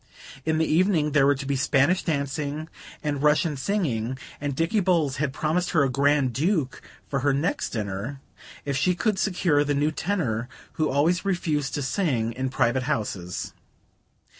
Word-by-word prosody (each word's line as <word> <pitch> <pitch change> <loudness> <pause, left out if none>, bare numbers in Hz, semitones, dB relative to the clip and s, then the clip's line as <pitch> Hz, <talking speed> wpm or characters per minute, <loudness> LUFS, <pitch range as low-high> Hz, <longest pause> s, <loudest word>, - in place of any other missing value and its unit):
In 160 0 +2
the 160 - +2
evening 165 -2 +2
there 140 -2 +4
were 145 - +4
to 135 +1 -6
be 140 0 0
Spanish 140 +5 +3
dancing 150 0 -2 0.3
and 145 -2 -1
Russian 150 +1 +3
singing; 130 - -1 0.2
and 145 -2 -2
Dicky 165 +8 +1
Bowles 170 -8 +1
had 145 -1 0
promised 160 +5 0
her 155 -4 +4
a 135 - +1
Grand 140 -1 +2
Duke 155 - 0 0.3
for 140 - -1
her 140 +1 +2
next 150 +6 -1
dinner, 105 +5 -4 0.5
if 140 -1 -1
she 175 +7 +2
could 205 +2 0
secure 175 -7 +2
the 145 0 0
new 145 +2 +1
tenor 140 - -2 0.2
who 155 -2 0
always 160 +6 +2
refused 160 -7 -1
to 145 - -2
sing 130 - 0
in 130 +2 -2
private 130 0 +1
houses. 95 - -3
145 Hz, 165 wpm, -25 LUFS, 135-165 Hz, 0.5 s, there